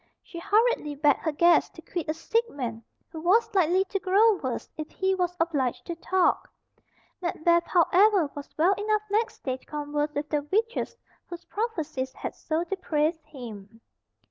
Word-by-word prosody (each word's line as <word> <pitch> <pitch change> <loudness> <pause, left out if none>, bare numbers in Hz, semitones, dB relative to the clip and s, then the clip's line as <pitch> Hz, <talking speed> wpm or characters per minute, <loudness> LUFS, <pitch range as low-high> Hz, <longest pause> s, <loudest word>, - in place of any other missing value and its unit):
She 340 - -9
hurriedly 420 -6 +2
begged 290 0 +3
her 315 - -1
guests 340 +4 +4
to - - -10
quit 340 -4 -4
a 310 - 0
sick 455 +8 0
man 230 -5 -5 0.3
who 320 - -7
was 395 +8 +4
likely 370 0 +3
to 395 0 -3
grow 400 +3 +4
worse 260 -7 -4
if 310 -1 -6
he 380 0 0
was 360 -1 -1
obliged 290 -7 0
to 340 - -4
talk. 365 +1 +1 0.7
Macbeth, 340 -1 +2
however, 370 0 +4
was 285 -1 -8
well 345 +5 +4
enough 425 0 +1
next 440 +2 -1
day 260 -1 -2
to - - -26
converse 295 0 -2
with 290 +1 -2
the 300 -1 0
witches 460 +3 0 0.3
whose 345 0 -8
prophecies 320 - -3
had - - -6
so 320 +1 -2
depraved 320 -3 -1
him. 225 -6 -10
340 Hz, 170 wpm, -27 LUFS, 295-385 Hz, 0.7 s, guests